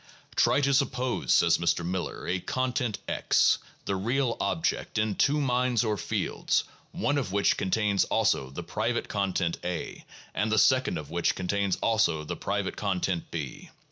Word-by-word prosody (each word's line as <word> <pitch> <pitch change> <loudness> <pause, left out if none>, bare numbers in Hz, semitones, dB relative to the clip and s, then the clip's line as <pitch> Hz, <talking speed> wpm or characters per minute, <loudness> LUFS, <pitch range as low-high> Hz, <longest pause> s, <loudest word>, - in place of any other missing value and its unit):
"Try 140 - +3
to 140 0 +2
suppose," 130 -2 0
says 85 -1 +5
Mr. 85 0 +1
Miller, 90 0 -3
"a 90 +1 0
content 125 +1 -1
X - - +3 0.3
[the 100 - -1
real 120 +5 0
object] 165 -7 -1
in 105 0 +1
two 145 +8 +2
minds 125 -3 +1
or 110 -2 0
fields 100 - -1 0.3
one 145 +6 0
of 115 -9 -4
which 100 0 +3
contains 100 0 +1
also 65 - +1
the 70 - -7
private - - -2
content 95 -4 -1
A, 90 -1 -4 0.3
and 110 +1 0
the 110 - +2
second 130 -5 +3
of 75 -1 -7
which 85 0 +1
contains 100 +1 0
also 110 -9 +2
the 75 - -4
private - - -2
content 95 -3 -1
B. 75 -5 -6
105 Hz, 160 wpm, -28 LUFS, 90-125 Hz, 0.3 s, says